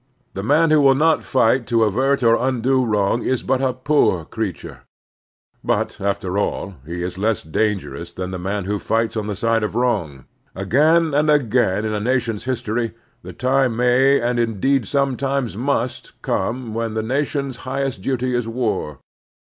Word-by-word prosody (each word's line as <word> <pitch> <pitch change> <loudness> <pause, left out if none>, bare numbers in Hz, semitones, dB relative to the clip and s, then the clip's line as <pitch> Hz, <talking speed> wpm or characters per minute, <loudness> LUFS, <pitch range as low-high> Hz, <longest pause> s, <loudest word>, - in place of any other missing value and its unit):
The 95 - -4
man 155 +9 +3
who 155 -1 +5
will 135 -1 +5
not 160 +3 +2
fight 125 -2 +2
to 115 +1 +2
avert 130 +6 +1
or 115 -1 +5
undo 130 +1 +1
wrong 105 0 +1
is 130 -1 -1
but 130 0 0
a 130 -1 +2
poor 130 - +1
creature; 105 -5 -5 0.8
but, - - -1
after 100 -1 -1
all, 100 -1 -2
he 85 +1 -4
is 90 +1 -5
less 110 +1 0
dangerous 85 0 -2
than 90 +1 -5
the 90 - -5
man 100 +2 -3
who 105 +1 -2
fights 115 +2 -1
on 110 -2 -2
the 105 - -3
side 115 +2 +1
of 105 0 -3
wrong. 85 - -1 0.3
Again 155 - +3
and 150 +2 +2
again 120 -8 +2
in 110 - -2
a 105 - -1
nation's 115 -1 -1
history 115 -2 -2 0.3
the - - -9
time 130 -2 +1
may, 125 +3 +4
and 120 0 0
indeed 115 +2 +1
some 140 -3 0
times 135 -6 -2
must, 125 0 -2
come 115 +3 -2
when 115 -1 -3
the 110 - -1
nation's 140 +1 -2
highest 135 -4 -3
duty 130 +2 -1
is 120 -2 -1
war. 115 - -2
120 Hz, 170 wpm, -20 LUFS, 105-135 Hz, 0.8 s, who